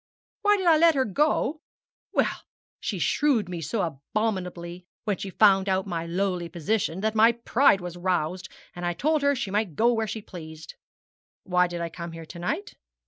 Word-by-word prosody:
'Why 415 0 +4
did 380 - -3
I 330 -2 +6
let 330 0 +5
her 265 -1 +2
go? 300 - +1 0.5
Well - - 0 0.4
she - - -3
shrewed 270 - +2
me 175 -2 -5
so 190 +7 -1
abominably 180 +2 -3 0.2
when 205 -3 -1
she 195 - -5
found 195 0 +4
out 190 0 +1
my 170 -3 -3
lowly 180 -1 -1
position 180 +1 -1
that 220 0 0
my 225 +2 +5
pride 235 -3 +3
was 175 0 -6
roused, 180 0 -1 0.3
and 175 - -7
I 175 0 0
told 300 - +1
her 285 0 +3
she 200 -6 -3
might 205 -6 -1
go 235 +6 +3
where 225 -1 -1
she 215 +1 -5
pleased. 160 -4 -10 0.7
Why 180 -1 +2
did 175 -1 -5
I 170 - -2
come 170 0 -7
here 165 0 -8
to 170 - -10
night? 315 - -3
190 Hz, 190 wpm, -26 LUFS, 175-230 Hz, 0.7 s, I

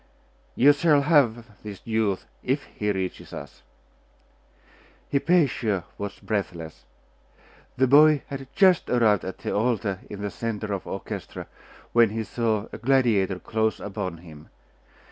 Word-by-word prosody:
'You 145 +4 +6
shall 145 -1 +3
have 120 -8 +1
this 105 -3 -8
youth, 110 -4 0 0.2
if 135 +3 -1
he 105 0 -3
reaches 95 -2 -4
us.' - - -9 1.5
Hypatia 140 - +2 0.2
watched 100 -1 -6
breathless. 85 -6 -4 0.9
The 130 - +4
boy 150 +2 +6
had 135 -1 -7
just 185 -3 +4
arrived 110 -5 +3
at 95 - -6
the - - -4
altar 105 -3 0
in 100 0 -7
the 100 - -3
centre 110 -2 -4
of 95 - -4
the - - -8
orchestra, 95 - -6 0.5
when 115 -2 +5
he 110 +1 -3
saw 110 -2 -1
a - - -7
gladiator 115 -7 +2
close 110 +3 -1
upon 95 -4 -5
him. 75 -2 -13
110 Hz, 135 wpm, -25 LUFS, 100-130 Hz, 1.5 s, You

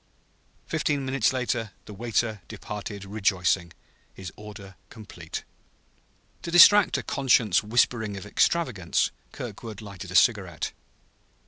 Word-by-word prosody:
Fifteen 145 -3 -1
minutes 130 -3 +1
later 120 -4 -2
the 105 - -10
waiter 110 -1 -1
departed 105 -1 -7
rejoicing, 95 -4 0 0.4
his 95 -3 -9
order 105 -2 -11
complete. 95 -7 -8 1.0
To - - -6
distract 190 +4 +7
a - - -4
conscience 120 -8 +2
whispering 110 -1 0
of 100 - -8
extravagance, 105 - +1 0.2
Kirkwood 110 -3 -8
lighted 100 -4 -9
a 90 - -7
cigarette. 95 -4 +2
105 Hz, 110 wpm, -26 LUFS, 95-120 Hz, 1.0 s, distract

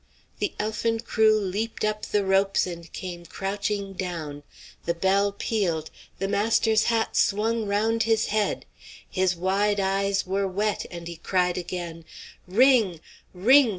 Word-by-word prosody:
The - - -1
elfin 225 +1 -1
crew 220 -2 +3
leaped 210 +3 -2
up 215 0 -2
the 205 -1 +1
ropes 195 +1 +3
and 170 -2 -8
came 175 -2 -6
crouching 200 +2 -3
down. 165 -6 -5 0.4
The 170 - 0
bell 195 +3 +2
pealed; 185 -7 -1 0.3
the 195 - -2
master's 220 +1 +2
hat 225 -1 +1
swung 220 +2 +1
round 220 +3 +1
his 225 0 +2
head. 215 -1 0 0.4
His 185 -1 +1
wide 200 +4 +1
eyes 195 +1 +1
were 195 +1 0
wet, 205 +3 -1
and 170 -1 -8
he 170 -1 -7
cried 180 0 +1
again, 175 -2 -5 0.4
"Ring! 220 - +4 0.4
ring! 250 +8 +6
200 Hz, 140 wpm, -26 LUFS, 180-215 Hz, 0.4 s, ring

